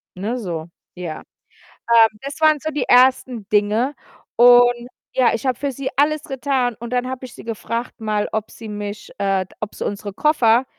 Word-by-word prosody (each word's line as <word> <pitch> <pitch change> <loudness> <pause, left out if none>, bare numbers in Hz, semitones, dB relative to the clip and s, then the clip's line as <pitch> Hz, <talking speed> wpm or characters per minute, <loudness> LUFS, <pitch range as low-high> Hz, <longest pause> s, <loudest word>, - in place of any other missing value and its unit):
ne, 215 +7 -3
so, 170 -6 -4 0.3
ja. 175 -3 -6 0.5
Ähm, 230 -1 +4
das 280 +3 -7
waren 310 -1 +5
so 315 - -3
die 295 - -2
ersten 250 -3 +3
Dinge 215 +7 +1 0.4
und 245 0 +6 0.3
ja, 255 -2 +3
ich 230 +3 -3
habe 250 -2 0
für 280 -1 -1
sie 270 +1 -4
alles 300 +1 +2
getan, 255 -3 -1
und 235 +1 -7
dann 250 +1 0
habe 260 0 -5
ich 245 - -12
sie - - -11
gefragt 230 +1 -4
mal, 210 -1 -1
ob 220 -1 -2
sie 225 -2 -10
mich 205 0 -6
äh, 195 -2 +1 0.2
ob 210 - -5
sie - - -4
unsere 205 0 -4
Koffer 250 -3 +3
235 Hz, 185 wpm, -20 LUFS, 210-260 Hz, 0.5 s, und